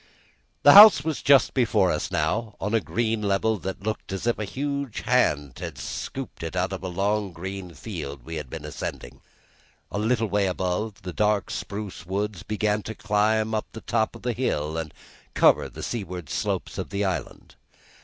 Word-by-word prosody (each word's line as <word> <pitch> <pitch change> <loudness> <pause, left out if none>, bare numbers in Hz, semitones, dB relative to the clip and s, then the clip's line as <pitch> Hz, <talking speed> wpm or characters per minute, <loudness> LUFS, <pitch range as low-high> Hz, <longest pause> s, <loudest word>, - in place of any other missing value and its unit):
The - - +9
house 205 -8 +10
was 155 -2 -2
just 140 -1 +5
before 110 -7 +3
us - - -2
now, 105 +8 -1
on 105 - -2
a 115 - +4
green 115 0 -1
level 105 +1 +1
that 95 0 -5
looked 110 -1 -4
as 95 +3 -4
if 120 -2 +1
a 105 - -2
huge 140 +3 -3
hand 70 -2 +1
had 85 -6 -6
scooped 125 - -6
it 80 +1 -5
out 90 +1 0
of 95 - -5
the 95 - -4
long 100 +2 0
green 90 0 -7
field 70 - -6
we 80 -1 -5
had 75 -4 -6
been - - -7
ascending. 65 +2 -6 0.7
A 100 - -2
little 115 +1 +1
way 100 -1 +1
above, 95 +3 -2
the 90 -2 -5
dark, 105 0 +1
spruce 100 -4 -5
woods 100 +1 -3
began 105 +1 0
to 110 +2 -7
climb 110 +1 +1 0.2
the 110 - -8
top 110 -1 0
of - - -12
the 125 -1 0
hill 80 - -1
and 80 -2 -3 0.4
cover - - +4
the - - -9
seaward 90 - -5
slopes - - -2
of - - -4
the 100 +1 -1
island. 90 -5 -4
100 Hz, 185 wpm, -25 LUFS, 90-110 Hz, 0.7 s, house